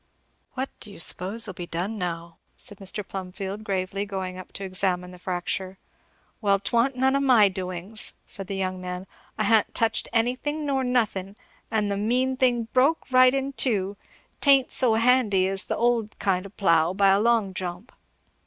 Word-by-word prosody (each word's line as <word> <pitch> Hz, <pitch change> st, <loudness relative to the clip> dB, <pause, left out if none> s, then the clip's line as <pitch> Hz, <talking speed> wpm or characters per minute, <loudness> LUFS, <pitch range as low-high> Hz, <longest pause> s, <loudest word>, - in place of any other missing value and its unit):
"What 265 Hz, +1 st, -3 dB
do 210 Hz, -, -8 dB
you -, -, -12 dB
s'pose'll 195 Hz, +5 st, -1 dB
be 175 Hz, -1 st, -7 dB
done 180 Hz, +7 st, -2 dB
now?" 170 Hz, -2 st, -5 dB, 0.2 s
said 205 Hz, -, -1 dB
Mr. 195 Hz, +1 st, -4 dB
Plumfield 195 Hz, +2 st, -6 dB
gravely 195 Hz, 0 st, -2 dB
going 190 Hz, -2 st, -5 dB
up 185 Hz, 0 st, -10 dB
to 195 Hz, -, -6 dB
examine 185 Hz, -1 st, -1 dB
the 180 Hz, -, -13 dB
fracture. 185 Hz, +1 st, -3 dB, 0.6 s
"Well 200 Hz, -2 st, +3 dB
'twa'n't 235 Hz, +6 st, +1 dB
none 265 Hz, +1 st, +2 dB
of 275 Hz, -, +2 dB
my 240 Hz, -7 st, +6 dB
doings," 185 Hz, +2 st, -3 dB
said 195 Hz, -2 st, -4 dB
the 195 Hz, -, -4 dB
young 185 Hz, -1 st, -3 dB
man. 180 Hz, 0 st, -5 dB, 0.3 s
"I 215 Hz, -, 0 dB
ha'n't 220 Hz, 0 st, +2 dB
touched 225 Hz, -1 st, +1 dB
anything 255 Hz, +6 st, -1 dB
nor 270 Hz, -2 st, 0 dB
nothing 210 Hz, -6 st, -1 dB, 0.3 s
and 210 Hz, -2 st, 0 dB
the 200 Hz, -, -1 dB
mean 250 Hz, +5 st, +1 dB
thing 250 Hz, -3 st, +2 dB
broke 275 Hz, +3 st, +2 dB
right 255 Hz, 0 st, +7 dB
in 275 Hz, +1 st, -2 dB
teu. 205 Hz, -7 st, 0 dB, 0.4 s
'Tain't 275 Hz, -2 st, +4 dB
so 240 Hz, -4 st, +4 dB
handy 225 Hz, -5 st, +3 dB
as 195 Hz, +1 st, -1 dB
the -, -, -2 dB
old 235 Hz, -2 st, 0 dB
kind 190 Hz, 0 st, 0 dB
o' -, -, -14 dB
plough, 170 Hz, -3 st, +2 dB
by 200 Hz, 0 st, +4 dB
a 195 Hz, +1 st, +4 dB
long 225 Hz, -3 st, +2 dB
jump." 185 Hz, +4 st, -5 dB
200 Hz, 175 wpm, -25 LUFS, 185-240 Hz, 0.6 s, right